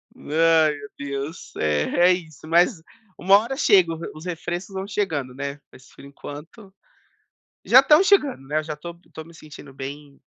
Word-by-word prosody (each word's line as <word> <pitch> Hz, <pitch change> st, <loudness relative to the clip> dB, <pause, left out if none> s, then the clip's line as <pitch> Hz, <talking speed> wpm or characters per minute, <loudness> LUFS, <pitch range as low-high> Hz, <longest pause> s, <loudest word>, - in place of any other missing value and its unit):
meu 155 Hz, -2 st, +1 dB
Deus. 140 Hz, +3 st, -6 dB
É, 75 Hz, -1 st, 0 dB, 0.3 s
é -, -, +6 dB
isso, 160 Hz, -4 st, -8 dB
mas 170 Hz, +2 st, +2 dB, 0.4 s
uma 195 Hz, +2 st, +5 dB
hora 235 Hz, +5 st, -4 dB
chega. 185 Hz, -, +4 dB
Os 165 Hz, -, -9 dB
os 155 Hz, +3 st, -11 dB
refrescos 175 Hz, +2 st, -5 dB
vão 190 Hz, +1 st, -4 dB
chegando, 160 Hz, -11 st, -3 dB
né. 140 Hz, +1 st, -6 dB
Mas, 130 Hz, -, -18 dB
por -, -, -16 dB
enquanto 150 Hz, +8 st, -11 dB, 0.9 s
já -, -, +8 dB
estão 305 Hz, +4 st, +5 dB
chegando, 290 Hz, -, +2 dB
né, 150 Hz, +2 st, -1 dB
eu -, -, -2 dB
já 155 Hz, -1 st, -6 dB
tô 170 Hz, +3 st, -9 dB, 0.2 s
tô 160 Hz, -, -9 dB
me 170 Hz, +1 st, -17 dB
sentindo 145 Hz, -3 st, -13 dB
bem 140 Hz, +1 st, -9 dB
160 Hz, 170 wpm, -23 LUFS, 140-185 Hz, 0.9 s, já